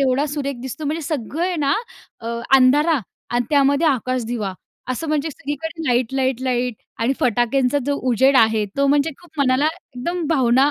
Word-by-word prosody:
एवढा 270 +2 +2
सुरेख 280 -3 -3
दिसतो. 265 +4 -6
म्हणजे 315 +3 -2
सगळे 310 +3 -2
आहे 360 - -2
ना 285 -2 +1 0.5
अ, 230 - -8 0.3
अंधार 290 +4 +4 0.3
आणि 240 0 +1
त्यामध्ये 285 +2 +3
आकाशदिवा 240 -6 -1 0.4
असं 305 +5 -3
म्हणजे 305 0 0
सगळीकडे 300 +4 -5
लाईट-लाईट-लाईट 250 0 0 0.3
आणि 250 +4 +2
फटाक्यांचा 250 +3 +2
जो 285 - +1 0.2
उजेड 265 +4 +4
आहे. 220 -2 +4
तो 280 0 +3
म्हणजे 285 +2 +2
खूप 330 -3 -19
मनाला 265 +2 +3 0.3
एकदम 345 +6 -2
भावना 265 -1 +3
270 Hz, 150 wpm, -21 LUFS, 250-295 Hz, 0.5 s, अंधार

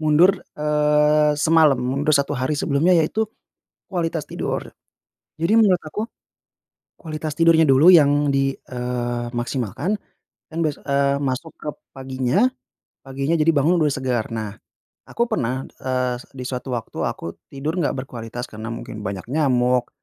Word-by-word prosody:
mundur, 165 +5 +4 0.2
eee, 150 0 +3
semalam, 155 -1 +4
mundur 135 +5 0
satu 140 0 0
hari 130 +4 -1
sebelumnya 160 +6 +3
ya 165 - +4
itu 215 +7 -1 0.6
kualitas 165 -4 -2
tidur. - - -4 0.7
Jadi 165 +5 +1
menurut 200 -6 +5
aku, 180 +8 -4 0.9
kualitas 155 -2 -5
tidurnya 165 -1 +5
dulu 145 +7 +7
yang 145 -3 +5
di 135 0 +1
eee, 125 -1 -3
maksimalkan 125 - -2 0.6
dan - - -5
bes 155 -3 0
eee, 140 0 +1
masuk 140 +3 -3
ke 150 - -5 0.2
paginya, 130 - +1 0.6
paginya 135 +4 -1
jadi 160 0 +4
bangun 155 +3 +3
udah 150 - +2
segar. 125 -5 -2
Nah, 110 -2 -4 0.5
aku 235 - 0
pernah, 130 - -2 0.2
eee, 125 -1 -1
se - - -15
di 130 - -5
suatu 125 +1 -5
waktu 115 - -6
aku 85 - -6 0.2
tidur 150 +6 -3
nggak 150 - 0
berkualitas 120 -1 -7
karena 110 -1 -8
mungkin 115 -2 -7
banyak 100 -2 -5
nyamuk, 125 -4 +2
140 Hz, 145 wpm, -22 LUFS, 125-155 Hz, 0.9 s, dulu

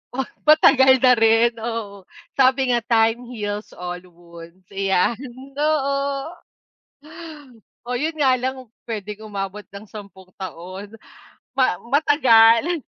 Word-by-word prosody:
Ah! 265 - -1 0.2
Matagal 265 -4 +5
na 255 - +7
rin, 225 +1 +4
oo. 215 -4 -6 0.3
Sabi 260 -1 +3
nga, 240 - +2
time 230 +1 +1
heals 210 -3 -6
all 180 0 -6
wounds 170 +1 -15
iyan, 195 +3 0 0.4
oo. 280 +1 -1 1.5
Oh 250 - -4
'yun 310 +6 -2
nga 270 -3 +3
lang 260 +2 -3
kung 255 -3 -13 0.2
puwedeng 210 -2 -6
umabot 200 0 -6
ng 200 +2 -11
sampung 195 -3 -13
taon, 190 +3 -8 0.6
ma 255 -8 +1
matagal 280 +1 +4
225 Hz, 115 wpm, -21 LUFS, 200-265 Hz, 1.5 s, na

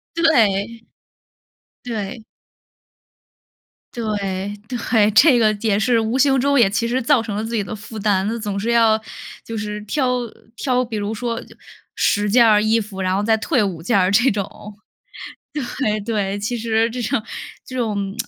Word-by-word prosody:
对， 230 -8 +2 1.0
对。 225 -1 -5 1.7
对， 230 -2 -4 0.6
对， 220 -3 +1
这 255 +3 +6
个 215 -2 +3
也 210 -3 +1
是 230 +1 +2
无 225 +3 -1
形 270 0 +3
中 280 +1 +2
也 210 - +5
其 225 +4 -1
实 255 +2 0
造 250 0 +3
成 215 -3 -5
了 215 - -2
自 230 +1 -4
己 210 - 0
的 195 - -7
负 215 +1 -10
担， 200 -2 +1
那 230 +2 -2
总 205 -3 -3
是 225 - -2
要 225 -2 +4 0.4
就 225 - -5
是 210 0 -4
挑 255 +5 -1
呃， 235 -2 -6 0.2
挑 255 0 0
比 225 -3 -5
如 205 +1 -3
说， 230 +1 -3 0.5
10 205 0 +1
件 235 +3 +5
儿 210 -1 +5
衣 220 +1 +2
服， 200 -3 -6
然 185 0 0
后 200 - 0
再 220 0 +3
退 250 0 +1
5 180 -5 -3
件 200 +5 +1
儿 185 0 +3
这 245 +6 +4
种。 200 -3 -1 1.4
对， 215 -5 0
对。 205 -2 -2
其 210 +4 -2
实 225 0 +1
这 245 +2 -5
种 230 0 -1 0.4
这 255 - -8
种 205 -5 -2
220 Hz, 175 characters per minute, -20 LUFS, 205-240 Hz, 1.7 s, 这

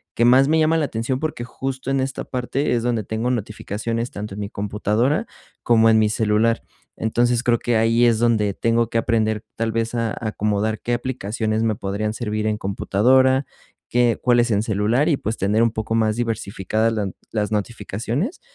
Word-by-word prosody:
que 120 - +3
más 130 +3 +6
me 160 +1 +3
llama 160 +1 +3
la 155 - +1
atención, 125 +2 -2
porque 155 -5 -3
justo 130 +1 -5
en 135 - +1
esta 130 0 -3
parte 130 +3 -1
es 115 - -1
donde 120 -3 0
tengo 110 +5 -2
notificaciones, 115 +1 -3
tanto 105 -1 -6
en - - -7
mi 100 - -4
computadora 105 - 0 0.4
como 115 -1 +4
en 110 - +5
mi 110 - +3
celular. 110 +1 +1 0.4
Entonces 120 +1 +1
creo 120 -2 +3
que 120 -2 +1
ahí 115 +2 +3
es 115 -2 +3
donde 110 -4 +2
tengo 115 +2 +1
que 115 - +2
aprender 110 -1 0
tal 115 0 -1
vez 115 +1 -1
a 115 -2 -1
acomodar 105 0 -1
qué 120 - -2
aplicaciones 115 -3 -2
me 110 -1 +2
podrían 100 +2 -3
servir 110 -2 -3
en 105 - 0
computadora, 130 +7 +2 0.4
qué, 120 -1 +2
cuáles 120 -1 +3
en 105 0 +2
celular, 110 - +1
y, 150 - +2
pues, 110 -1 -3
tener 105 +4 +2
un 115 - +2
poco 110 +1 -3
más 110 -1 +2
diversificadas 110 -1 -1
las 105 -3 -1 0.2
las 105 -1 -1
notificaciones 115 - -3
115 Hz, 185 wpm, -21 LUFS, 110-120 Hz, 0.4 s, más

